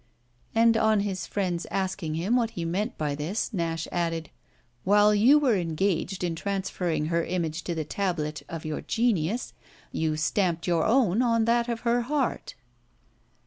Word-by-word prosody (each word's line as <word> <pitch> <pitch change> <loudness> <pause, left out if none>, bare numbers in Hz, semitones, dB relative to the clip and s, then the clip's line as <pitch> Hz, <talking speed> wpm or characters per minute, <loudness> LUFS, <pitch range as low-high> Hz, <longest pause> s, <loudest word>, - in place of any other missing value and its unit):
And 230 0 +5
on 220 -2 +3
his 195 -2 -3
friend's 180 -4 -2
asking 190 -4 -2
him 185 +9 0
what 235 -3 +2
he 170 -6 -5
meant 195 +7 -2
by 150 -2 -1
this 165 +11 -3
Nash 165 -3 -2
added: 165 -2 -2 0.5
"While 205 +2 +5
you 235 +8 +6
were 270 -7 +3
engaged 180 +1 -1
in 175 -2 0
transferring 180 -4 -2
her 170 0 +1
image 170 -2 -2
to 170 - -2
the 160 -1 -2
tablet 155 -4 -2
of 165 -1 -6
your 155 -1 -3
genius 225 -2 0 0.4
you 155 -1 -1
stamped 165 +1 0
your 170 -2 +1
own 230 -3 +3
on 230 -2 +2
that 235 +1 +2
of 230 -1 -2
her 240 0 +2
heart." 270 +1 -2
185 Hz, 160 wpm, -27 LUFS, 165-225 Hz, 0.5 s, you